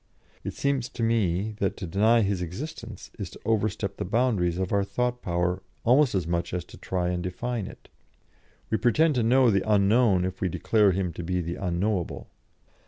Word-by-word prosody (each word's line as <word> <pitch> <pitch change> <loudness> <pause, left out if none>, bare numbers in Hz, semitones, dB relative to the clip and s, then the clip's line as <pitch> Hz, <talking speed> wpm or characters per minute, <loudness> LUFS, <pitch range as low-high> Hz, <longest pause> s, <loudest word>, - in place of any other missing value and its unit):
It - - -5
seems 135 -3 0
to 120 - -4
me 110 -3 +1
that 95 - -1
to - - -5
deny 110 +7 +3
His 100 -3 0
existence 115 - -7
is - - -4
to - - -14
overstep 105 -2 0
the - - -2
boundaries 100 -5 +1
of 95 -1 -2
our 100 -1 +3
thought 125 +4 -2
power 90 +1 -1 0.2
almost 130 0 +4
as 90 -4 0
much 85 +1 -2
as 90 - -3
to - - -14
try 90 -1 -1
and 90 0 -2
define 105 +4 -3
it. - - -13 0.8
We 110 - +1
pretend 150 +6 +3
to 125 - +1
know 125 +1 +4
the 95 -1 +2
Unknown 100 -2 +4
if 95 0 -5
we 95 - +1
declare 105 +3 +3
Him 90 -2 -1
to 90 - -6
be 90 +2 -1
the 85 0 -3
Unknowable. 90 +1 -2
100 Hz, 190 wpm, -26 LUFS, 90-115 Hz, 0.8 s, almost